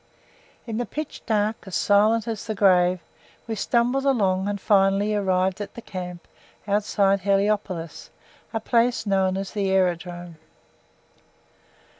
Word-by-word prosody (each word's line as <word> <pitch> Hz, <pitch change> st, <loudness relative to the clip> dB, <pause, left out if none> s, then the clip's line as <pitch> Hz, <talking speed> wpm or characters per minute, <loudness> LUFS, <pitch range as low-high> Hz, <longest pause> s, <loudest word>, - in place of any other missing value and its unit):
In 225 Hz, -2 st, -4 dB
the 245 Hz, -, -2 dB
pitch 305 Hz, 0 st, -6 dB
dark, 215 Hz, -1 st, +1 dB
as 190 Hz, -, -5 dB
silent 215 Hz, +3 st, +3 dB
as 220 Hz, -3 st, -4 dB
the 215 Hz, -, -2 dB
grave, 180 Hz, -2 st, +3 dB, 0.4 s
we 225 Hz, -, -4 dB
stumbled 240 Hz, +5 st, +1 dB
along, 200 Hz, -8 st, +1 dB
and 205 Hz, 0 st, -2 dB
finally 195 Hz, +1 st, +2 dB
arrived 190 Hz, -1 st, 0 dB
at 205 Hz, -, -7 dB
the 235 Hz, -, -8 dB
camp 180 Hz, -2 st, -7 dB, 0.4 s
outside 200 Hz, -1 st, +2 dB
Heliopolis, 195 Hz, -3 st, -1 dB, 0.4 s
a 225 Hz, -, -2 dB
place 235 Hz, +2 st, +1 dB
known 190 Hz, -2 st, +1 dB
as 195 Hz, 0 st, -4 dB
the 200 Hz, -3 st, -1 dB
Aerodrome. 175 Hz, -2 st, -1 dB
200 Hz, 130 wpm, -24 LUFS, 185-220 Hz, 0.4 s, silent